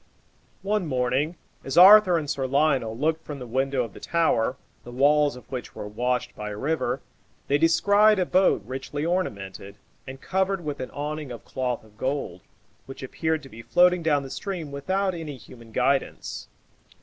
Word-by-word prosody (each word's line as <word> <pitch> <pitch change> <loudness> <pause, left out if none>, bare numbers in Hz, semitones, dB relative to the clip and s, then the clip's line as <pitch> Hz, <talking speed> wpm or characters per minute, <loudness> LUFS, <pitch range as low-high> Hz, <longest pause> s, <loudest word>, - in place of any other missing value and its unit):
One 205 -3 0
morning, 130 +4 0 0.3
as 135 - -4
Arthur 190 -1 +9
and 155 -3 -3
Sir 135 -2 -2
Lionel 135 -5 +1
looked 160 +4 0
from 150 - -7
the 125 - -7
window 130 +2 0
of 115 -4 -8
the - - -11
tower, 135 -7 +1 0.3
the - - -11
walls 145 +3 +3
of 125 - -12
which 125 -2 -6
were 105 - -6
washed 125 +3 -2
by 105 0 -5
a 105 - -6
river, 155 +8 -1 0.5
they 145 +1 +2
descried 205 +6 +4
a 185 - +1
boat 185 - +3
richly 135 +4 -4
ornamented, 100 - -3 0.3
and 130 0 -8
covered 190 0 -1
with 145 -1 -4
an 130 - -5
awning 150 -1 -5
of 120 - -9
cloth 125 -3 -3
of 110 0 -22
gold, 130 -10 -3 0.5
which 135 0 -9
appeared 160 +3 -2
to 135 - -12
be 115 -1 -11
floating 180 +7 +4
down 150 -3 +1
the 135 - -8
stream 180 -7 -5
without 185 +7 -1
any 160 -5 -6
human 115 -1 -15
guidance. 135 +4 -1
140 Hz, 175 wpm, -25 LUFS, 125-165 Hz, 0.5 s, Arthur